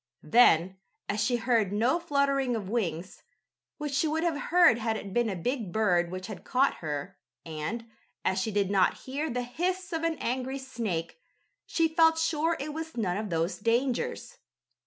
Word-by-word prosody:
Then, 190 Hz, -5 st, +4 dB, 0.3 s
as 210 Hz, +2 st, 0 dB
she 245 Hz, +3 st, +1 dB
heard 230 Hz, -4 st, +1 dB
no 235 Hz, +11 st, +2 dB
fluttering 280 Hz, -5 st, +1 dB
of 210 Hz, -4 st, -4 dB
wings, 185 Hz, -6 st, -3 dB, 0.6 s
which 295 Hz, -1 st, -4 dB
she 300 Hz, +3 st, +2 dB
would 320 Hz, +2 st, 0 dB
have 325 Hz, -4 st, -1 dB
heard 345 Hz, -9 st, +6 dB
had 225 Hz, -1 st, -1 dB
it 200 Hz, -2 st, -7 dB
been 240 Hz, 0 st, +2 dB
a 195 Hz, -, -2 dB
big 220 Hz, +2 st, -2 dB
bird 180 Hz, -5 st, +2 dB
which 185 Hz, +1 st, -6 dB
had 210 Hz, 0 st, -8 dB
caught 270 Hz, +2 st, +2 dB
her, 150 Hz, -3 st, -5 dB, 0.3 s
and, 165 Hz, +9 st, -4 dB, 0.4 s
as 190 Hz, 0 st, +1 dB
she 220 Hz, -, -1 dB
did 200 Hz, -2 st, 0 dB
not 190 Hz, -2 st, +3 dB
hear 285 Hz, +4 st, -2 dB
the 250 Hz, 0 st, -2 dB
hiss 360 Hz, +8 st, -3 dB
of 325 Hz, -, -1 dB
an 330 Hz, -1 st, 0 dB
angry 260 Hz, +2 st, -2 dB
snake, 230 Hz, -, -4 dB, 0.5 s
she 330 Hz, -1 st, +2 dB
felt 320 Hz, 0 st, +4 dB
sure 325 Hz, 0 st, +1 dB
it 295 Hz, +2 st, -4 dB
was 320 Hz, -2 st, -6 dB
none 190 Hz, -5 st, 0 dB
of 215 Hz, 0 st, -3 dB
those 165 Hz, +1 st, -1 dB
dangers. 235 Hz, +4 st, -1 dB
240 Hz, 180 wpm, -28 LUFS, 195-295 Hz, 0.6 s, heard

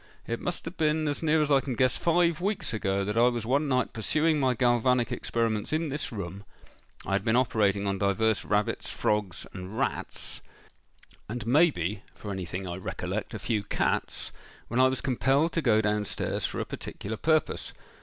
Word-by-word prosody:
It 115 Hz, 0 st, -3 dB
must 175 Hz, -, -4 dB
have 165 Hz, +3 st, -7 dB
been, 155 Hz, 0 st, +2 dB
as 145 Hz, -1 st, -2 dB
near 160 Hz, -1 st, +3 dB
as 150 Hz, -, -1 dB
I 140 Hz, -, +6 dB
can 130 Hz, -2 st, -3 dB
guess, 130 Hz, +2 st, +3 dB
five 170 Hz, -1 st, +2 dB
weeks 200 Hz, -, -1 dB
ago 100 Hz, -2 st, 0 dB
that 105 Hz, +2 st, -2 dB
I 120 Hz, +1 st, +5 dB
was 120 Hz, -3 st, -1 dB
one 140 Hz, +5 st, +2 dB
night 130 Hz, -3 st, +1 dB
pursuing 155 Hz, +7 st, +1 dB
my 130 Hz, -2 st, +2 dB
galvanic 120 Hz, 0 st, +2 dB
experiments 115 Hz, -3 st, -1 dB
in 155 Hz, 0 st, 0 dB
this 145 Hz, +2 st, -3 dB
room—I 100 Hz, -1 st, -9 dB
had 100 Hz, 0 st, +1 dB
been 110 Hz, +2 st, +2 dB
operating 105 Hz, -5 st, +2 dB
on 100 Hz, -1 st, -1 dB
divers 100 Hz, +2 st, +2 dB
rabbits, 105 Hz, 0 st, 0 dB
frogs, 105 Hz, -4 st, -1 dB
and 95 Hz, +3 st, -7 dB
rats—and, 115 Hz, 0 st, -6 dB
may 150 Hz, +9 st, +5 dB
be, 100 Hz, -, -3 dB
for 105 Hz, -, -7 dB
anything 95 Hz, 0 st, -4 dB
I 85 Hz, 0 st, -4 dB
recollect, 95 Hz, -, -4 dB
a -, -, -2 dB
few 110 Hz, -2 st, -1 dB
cats,—when 115 Hz, +3 st, -3 dB
I 130 Hz, -, +7 dB
was 130 Hz, 0 st, -1 dB
compelled 140 Hz, +4 st, +2 dB
to 165 Hz, -, 0 dB
go 110 Hz, -7 st, +4 dB
down 105 Hz, 0 st, 0 dB
stairs -, -, -2 dB
for -, -, -5 dB
a -, -, -1 dB
particular 110 Hz, +2 st, -6 dB
purpose. 155 Hz, +3 st, +1 dB
115 Hz, 180 wpm, -28 LUFS, 105-145 Hz, -, I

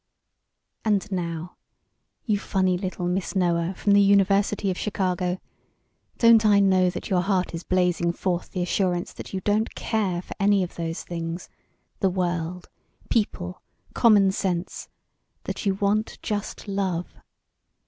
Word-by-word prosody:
"And 210 Hz, -1 st, 0 dB
now, 170 Hz, -2 st, -4 dB, 0.7 s
you 210 Hz, -3 st, +1 dB
funny 185 Hz, -2 st, +1 dB
little 180 Hz, -1 st, -3 dB
Miss 180 Hz, +2 st, -2 dB
Noah 175 Hz, -1 st, +1 dB
from 205 Hz, -, 0 dB
the 200 Hz, 0 st, +6 dB
University 200 Hz, 0 st, +3 dB
of 180 Hz, -, -4 dB
Chicago, 185 Hz, -3 st, -1 dB, 0.8 s
don't 230 Hz, -1 st, +6 dB
I 205 Hz, -2 st, +5 dB
know 190 Hz, -2 st, +4 dB
that 180 Hz, -, -6 dB
your 180 Hz, -2 st, +3 dB
heart 185 Hz, -1 st, 0 dB
is 165 Hz, -, -4 dB
blazing 180 Hz, -2 st, +1 dB
forth 175 Hz, 0 st, -2 dB
the 180 Hz, -, -2 dB
assurance 180 Hz, -1 st, 0 dB
that -, -, -9 dB
you 190 Hz, -, -3 dB
don't 210 Hz, +3 st, 0 dB
care 195 Hz, -6 st, -1 dB
for -, -, -8 dB
any 200 Hz, -1 st, +3 dB
of 180 Hz, -, -6 dB
those 165 Hz, 0 st, -4 dB
things 170 Hz, 0 st, -5 dB, 0.5 s
the 195 Hz, -, +3 dB
world, 175 Hz, -1 st, -2 dB, 0.4 s
people, 180 Hz, -5 st, -1 dB, 0.3 s
common 205 Hz, -5 st, +5 dB
sense 185 Hz, -3 st, -3 dB, 0.5 s
that -, -, -4 dB
you 195 Hz, -, +2 dB
want 205 Hz, +2 st, 0 dB
just 210 Hz, 0 st, -4 dB
love? 190 Hz, -3 st, -2 dB
185 Hz, 140 wpm, -25 LUFS, 180-200 Hz, 0.8 s, the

